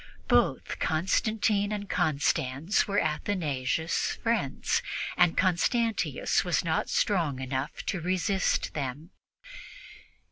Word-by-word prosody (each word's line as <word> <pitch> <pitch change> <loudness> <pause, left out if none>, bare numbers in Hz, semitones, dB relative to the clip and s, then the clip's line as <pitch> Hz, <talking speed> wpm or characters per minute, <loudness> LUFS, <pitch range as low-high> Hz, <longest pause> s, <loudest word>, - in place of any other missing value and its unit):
Both - - +1
Constantine 205 +5 +1
and 205 -1 -4
Constans 155 +1 +1
were 200 0 +1
Athanasius' 155 -3 -1
friends, 225 - 0 0.3
and 175 -2 +3
Constantius 220 +5 +1
was - - 0
not - - 0
strong 165 - +1
enough 130 +3 -4
to 190 -4 -2
resist 185 +3 0
them. 145 +4 -5
175 Hz, 95 wpm, -28 LUFS, 150-205 Hz, 0.3 s, and